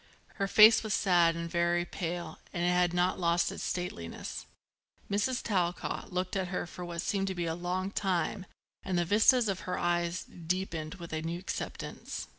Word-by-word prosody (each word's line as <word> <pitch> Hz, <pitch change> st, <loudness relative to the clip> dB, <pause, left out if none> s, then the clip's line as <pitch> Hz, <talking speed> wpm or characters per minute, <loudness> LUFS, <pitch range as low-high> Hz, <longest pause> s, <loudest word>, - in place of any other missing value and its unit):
Her 195 Hz, -, 0 dB
face 215 Hz, +3 st, +8 dB
was 215 Hz, -2 st, 0 dB
sad 175 Hz, -4 st, +4 dB
and 170 Hz, 0 st, -3 dB
very 170 Hz, 0 st, +1 dB
pale 170 Hz, -2 st, -4 dB
and 175 Hz, -, -2 dB
it -, -, +3 dB
had 180 Hz, -1 st, +3 dB
not 180 Hz, +1 st, +1 dB
lost 170 Hz, 0 st, +2 dB
its -, -, -7 dB
stateliness. 85 Hz, -, -4 dB, 0.6 s
Mrs. 240 Hz, +5 st, 0 dB
Talcott 180 Hz, -5 st, -1 dB
looked 180 Hz, +1 st, -2 dB
at 190 Hz, -2 st, 0 dB
her 180 Hz, 0 st, -2 dB
for 180 Hz, +1 st, -8 dB
what 170 Hz, 0 st, -4 dB
seemed 195 Hz, -2 st, 0 dB
to 190 Hz, -, -2 dB
be 175 Hz, -1 st, -2 dB
a 165 Hz, -, -1 dB
long 180 Hz, +3 st, -2 dB
time 190 Hz, 0 st, -1 dB, 0.3 s
and 185 Hz, -2 st, -2 dB
the 175 Hz, -, +2 dB
vistas 220 Hz, +5 st, +5 dB
of 195 Hz, -2 st, -1 dB
her -, -, -1 dB
eyes 175 Hz, -1 st, 0 dB
deepened 170 Hz, -2 st, -3 dB
with 170 Hz, -4 st, -9 dB
a 155 Hz, -, -1 dB
new 165 Hz, +1 st, -3 dB
acceptance. 185 Hz, -, -5 dB
175 Hz, 185 wpm, -31 LUFS, 170-190 Hz, 0.6 s, face